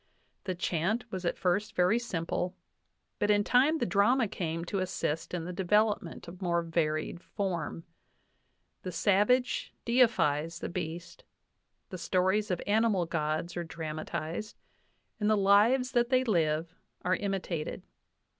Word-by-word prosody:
The 185 -2 -2
chant 180 +7 -1
was 185 -1 -4
at - - 0
first 205 +4 0
very 180 +6 +3
simple, 180 -4 -3 0.6
but 205 - +1
in 205 0 +4
time 270 +9 +4
the - - 0
drama 210 +6 +3
came 170 -4 -3
to 195 +3 -2
assist 180 -4 -2
in 175 -2 -3
the 180 - -5
devel 210 +4 +3
opment 170 -2 -10
of 180 +3 -10
more 170 -2 +1
varied 165 0 -1
form. 175 -6 -3 1.0
The 185 - -5
savage 210 +8 +2
deifies 165 - +2
the - - -5
beast; 170 0 -6 0.7
the 185 - -6
stories 185 +4 +1
of 180 -2 -1
animal 210 -3 +2
gods 155 +1 -2
are 175 - -2
dramatized, 160 +4 -5 0.6
and 210 -1 +1
the 215 - +4
lives 215 +6 +4
that 240 -1 +2
they 255 -1 +3
live 165 -6 +1 0.3
are 185 +1 +2
imitated. 190 -6 -3
185 Hz, 140 wpm, -30 LUFS, 170-210 Hz, 1.0 s, in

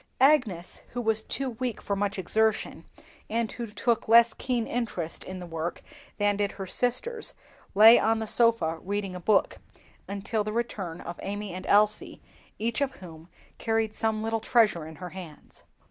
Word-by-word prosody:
Agnes, 250 - +2
who 245 - -3
was 220 -2 +1
too 265 +3 -3
weak 240 -1 -4
for 200 - -2
much 200 0 -1
exertion, 220 +4 0 0.4
and 230 0 -1
who 235 -1 -5
took 220 +2 -1
less 230 0 +6
keen 245 -2 -1
interest 215 -10 -3
in 185 0 -7
the 180 - -7
work 165 0 -5 0.3
than 205 -1 +2
did 205 -1 -1
her 195 - -6
sisters, 250 - 0 0.4
lay 220 +3 +9
on 225 +1 +2
the 220 - -3
sofa 220 -8 +2
reading 200 0 -3
a - - -5
book, 200 +3 +2 0.5
until 200 +2 -2
the 215 - -4
return 210 -7 -3
of 175 - -8
Amy 205 -1 -5
and 185 +1 -7
Elsie, 210 +1 +3 0.4
each 230 +5 -1
of 275 -1 0
whom 165 -2 -12 0.3
carried 225 -1 0
some 220 0 -1
little 225 0 -1
treasure 215 -8 +2
in 160 - -10
her 180 +1 -8
hands. 170 -4 -11
215 Hz, 170 wpm, -27 LUFS, 185-230 Hz, 0.5 s, lay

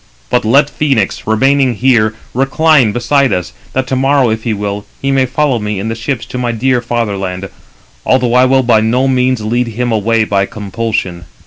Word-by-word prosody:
But 125 - +2
let 135 +7 +4
Phœnix, 135 -12 0
remaining 130 +3 +2
here, 110 -3 +2 0.2
recline 135 -1 +3
beside 130 +4 +1
us, 90 -1 -2 0.2
that 130 0 0
to 130 - -2
morrow, 135 -2 +2
if 110 0 -4
he 115 - 0
will, 100 -1 -3 0.2
he 135 - -1
may 135 -1 +2
follow 140 -2 0
me 105 -2 -3
in 110 +3 -3
the - - -2
ships 120 +1 -3
to 125 - -5
my 120 -1 -1
dear 125 +2 0
fatherland, 100 -6 -3 0.6
although 125 -2 +1
I 125 +1 +5
will 130 0 +3
by 115 -3 +3
no 125 +4 +1
means 130 -2 +1
lead 120 +3 -1
him 120 +2 -2
away 110 +1 +1
by 100 -2 0
compulsion." 100 -4 -4
120 Hz, 190 wpm, -13 LUFS, 110-130 Hz, 0.6 s, I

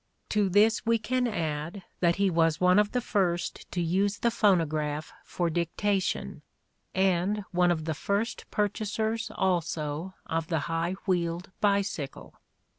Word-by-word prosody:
To 210 -2 +2
this 215 +4 +4
we 230 0 +3
can 250 +3 0
add 165 -1 -3 0.2
that 170 -1 +3
he 195 -1 +2
was 165 -1 +2
one 180 +2 +5
of 210 0 +2
the 250 - 0
first 180 -6 -1
to 180 - -2
use 195 +4 +1
the 235 - +1
phonograph 155 -8 +1
for 175 - -2
dic 170 0 -2
tation 200 -2 -1 0.5
and 190 +2 +1
one 180 -1 +3
of 160 -3 0
the 160 - -1
first 200 +9 -2
purchasers 220 +2 -1
also 170 -1 -1
of 165 -1 -2
the 165 -4 0
high 165 +3 -1
wheeled 175 -1 -1
bicycle. 200 -8 -1
185 Hz, 145 wpm, -28 LUFS, 165-205 Hz, 0.5 s, one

